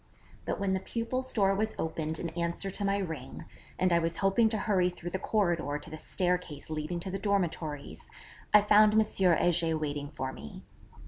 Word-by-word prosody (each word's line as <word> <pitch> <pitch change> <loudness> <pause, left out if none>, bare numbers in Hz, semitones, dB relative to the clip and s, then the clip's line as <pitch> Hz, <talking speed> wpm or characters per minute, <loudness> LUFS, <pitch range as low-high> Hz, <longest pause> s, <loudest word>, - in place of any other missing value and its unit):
But - - -2
when 195 -1 0
the 190 - +1
pupil's 255 +5 -3
door 195 -3 +3
was 215 +2 -1
opened 160 0 -2
in 170 - -3
answer 170 +3 -2
to 200 - -3
my 200 0 +2
ring, 160 - -5 0.3
and 185 -1 +2
I 170 - +5
was 165 0 -1
hoping 195 +4 +3
to 220 - -1
hurry 195 -4 +2
through 175 -1 -7
the 190 - -2
corridor 175 -10 0
to 150 - -8
the 155 - -6
staircase 180 -5 -2
leading 155 +3 -3
to 190 - -5
the 195 - -3
dormitories, 165 - -2 0.4
I 210 - +8
found 210 +1 +6
M. 220 - +6
Heger 175 -5 +2
waiting 145 -2 -3
for 130 -3 -4
me. 75 - -10
180 Hz, 190 wpm, -30 LUFS, 160-200 Hz, 0.4 s, I